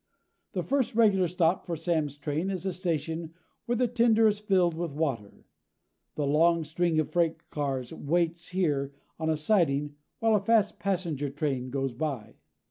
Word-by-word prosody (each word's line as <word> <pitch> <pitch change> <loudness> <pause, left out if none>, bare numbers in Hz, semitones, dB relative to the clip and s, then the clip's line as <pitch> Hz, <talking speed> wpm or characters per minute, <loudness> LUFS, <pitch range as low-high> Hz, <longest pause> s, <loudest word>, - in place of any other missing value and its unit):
The - - -1
first 270 -5 0
regular 205 -5 +4
stop 175 +1 +1
for 170 - -3
Sam's 160 -3 -1
train 150 +5 -2
is 190 -1 -4
a 190 - -1
station 165 -2 -3 0.3
where 240 - +1
the 245 +1 +2
tender 230 -1 +3
is 210 -1 +3
filled 190 -5 +2
with 165 -2 -4
water. 135 -10 -3 0.7
The 150 - -1
long 165 +3 +3
string 160 +1 0
of 155 - -1
freight 165 -2 0
cars 135 -4 -3
waits 170 +2 -1
here 145 -7 0 0.3
on 160 0 -1
a 160 - +1
siding 150 -5 +1 0.2
while 225 -1 +2
a 210 - +4
fast 210 +1 +2
passenger 170 -6 -1
train 140 -3 -2
goes 135 -1 -2
by. 140 -4 -4
165 Hz, 165 wpm, -28 LUFS, 145-190 Hz, 0.7 s, regular